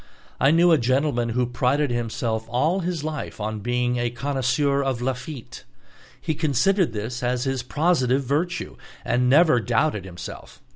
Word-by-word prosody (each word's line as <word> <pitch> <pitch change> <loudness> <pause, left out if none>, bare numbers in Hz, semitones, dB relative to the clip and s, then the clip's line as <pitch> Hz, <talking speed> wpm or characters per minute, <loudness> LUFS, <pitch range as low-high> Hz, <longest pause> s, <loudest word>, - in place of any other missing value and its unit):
I 135 - +4
knew 170 +3 +5
a 160 - +5
gentleman 130 -1 +1
who 125 +2 +1
prided 130 +3 0
himself 115 -1 -2
all 150 +10 +1
his 175 -4 -3
life 155 -6 -5
on 110 0 -3
being 125 +2 0
a 120 0 0
connoisseur 140 +2 0
of 135 -3 -1
Lafitte. 130 +1 -5 0.6
He 155 +4 -2
considered 160 - +2
this 110 +3 -4
as 125 0 0
his 135 -2 -1
positive 135 -1 +1
virtue, 155 +7 -2 0.3
and 125 +1 +2
never 155 -2 +5
doubted 115 - 0
himself. 90 -2 -9
130 Hz, 150 wpm, -24 LUFS, 120-150 Hz, 0.6 s, knew